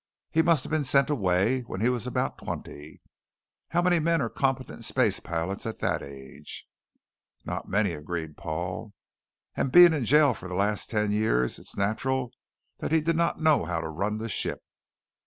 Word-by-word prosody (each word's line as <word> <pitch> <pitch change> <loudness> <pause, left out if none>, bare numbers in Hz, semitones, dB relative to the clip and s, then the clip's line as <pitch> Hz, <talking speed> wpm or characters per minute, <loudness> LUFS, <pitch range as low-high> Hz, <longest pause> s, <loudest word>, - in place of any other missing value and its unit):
He 160 - +4
must 165 -5 +3
have - - -8
been 155 -1 +1
sent 140 +2 +3
away 105 +1 +2
when 120 -6 -7
he 115 - +2
was 125 -1 -1
about 125 - -2
twenty. 75 +1 -8 0.7
How 175 +1 +1
many 175 -1 +3
men 165 +1 +2
are 115 -5 -1
competent 135 -1 -2
space - - +1
pilots 90 +5 -3
at 110 - -4
that - - -1
age?" 70 -1 -9 0.8
"Not - - -5
many," 100 -1 +2
agreed 80 0 -5
Paul. 90 +6 -5 0.6
"And 130 - -1
being 175 +2 +9
in 140 -6 -1
jail 145 +2 +5
for 95 -3 -9
the 90 - -5
last 105 +2 0
ten 105 -2 0
years, 105 - +1
it's - - -10
natural 120 +5 -1 0.5
that - - -3
he 160 - +5
did 165 +2 0
not 170 0 0
know 155 - +4
how 85 0 -2
to 80 -1 -4
run 100 +7 -2
the 110 +1 -4
ship." - - -2
110 Hz, 180 wpm, -27 LUFS, 90-145 Hz, 0.8 s, being